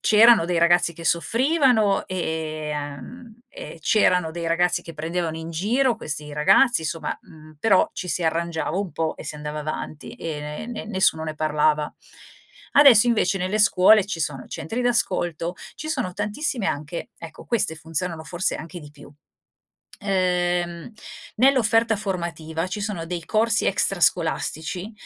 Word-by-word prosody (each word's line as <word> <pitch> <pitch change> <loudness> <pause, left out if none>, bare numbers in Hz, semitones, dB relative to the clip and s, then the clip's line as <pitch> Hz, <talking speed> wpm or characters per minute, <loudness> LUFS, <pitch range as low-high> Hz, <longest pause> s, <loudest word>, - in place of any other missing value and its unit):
c'erano 220 -2 +6
dei 175 -1 0
ragazzi 170 0 +4
che 165 - -10
soffrivano 235 - +2
e 160 -4 -4
uhm, 150 - -8
e - - -9
c'erano 180 -6 +2
dei 170 0 -5
ragazzi 175 +2 +1
che 165 - -10
prendevano 160 +1 -3
in 160 0 -7
giro 235 +10 +1
questi 150 -1 -4
ragazzi, 165 - +4
insomma, 160 +1 -3
mhmm, 155 -1 -16
però 195 -2 +3
ci 180 - -6
si 180 - -1
arrangiava 165 0 -1
un 195 -3 -4
po' 160 -1 -2
e - - -10
si - - -5
andava 150 0 -6
avanti, 155 0 -6
e 155 -3 -5
ne 150 +7 -6
ne 235 -3 -6
nessuno 190 -6 +1
ne 155 - -4
parlava. 150 0 0 0.8
Adesso 255 -6 +7
invece 195 -4 +1
nelle 185 +3 -1
scuole 210 0 +5
ci 175 -4 -4
sono 135 -4 -3
centri 225 +9 -4
d'ascolto, 175 -8 0 0.2
ci 310 - -7
sono 255 - -2
tantissime 210 +3 -2
anche 150 +4 -4
ecco 165 -1 -11
queste 220 -9 +1
funzionano 160 +1 -4
forse 175 +6 -1
anche 170 +2 -9
di 150 - -12
più, 145 0 -15 1.0
uhm, 180 -2 -1 0.5
nell'offerta 230 -3 +3
formativa 170 -4 -4
ci 205 +3 -5
sono 195 -6 -4
dei 170 -1 -5
corsi 220 0 +1
extrascolastici, 175 0 0
175 Hz, 150 wpm, -23 LUFS, 160-215 Hz, 1.0 s, Adesso